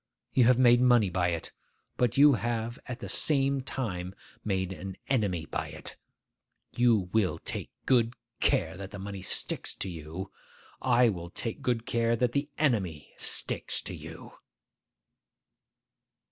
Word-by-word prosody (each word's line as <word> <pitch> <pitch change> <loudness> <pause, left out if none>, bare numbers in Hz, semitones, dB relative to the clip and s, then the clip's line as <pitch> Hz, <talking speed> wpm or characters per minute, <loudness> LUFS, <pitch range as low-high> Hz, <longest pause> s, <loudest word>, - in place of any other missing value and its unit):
You 125 - +5
have 125 0 +6
made 120 -1 +6
money 120 -6 +5
by 90 0 +1
it, 85 -2 -2 0.4
but 120 -1 +1
you 145 +1 +8
have 115 +2 -2
at 125 -2 -4
the - - -5
same 140 -2 +1
time 95 -8 -4 0.3
made 95 -2 -1
an 95 0 -7
enemy 100 - +1
by - - -3
it. - - -9 0.8
You 110 -7 +3
will 105 -5 +2
take - - -4 0.2
good 120 -2 +3 0.2
care 80 +1 +2
that 95 0 -7
the 100 - -8
money 100 0 -6
sticks 90 - -2
to 95 - -3
you; 85 +3 -7 0.5
I 125 -1 +5
will 85 -4 -4
take 115 +5 -3
good 120 -2 0
care 115 0 +1
that 120 +1 +1
the 140 +3 -1
enemy 100 - 0
sticks - - -2
to - - -5
you. - - -10
115 Hz, 145 wpm, -29 LUFS, 95-125 Hz, 0.8 s, you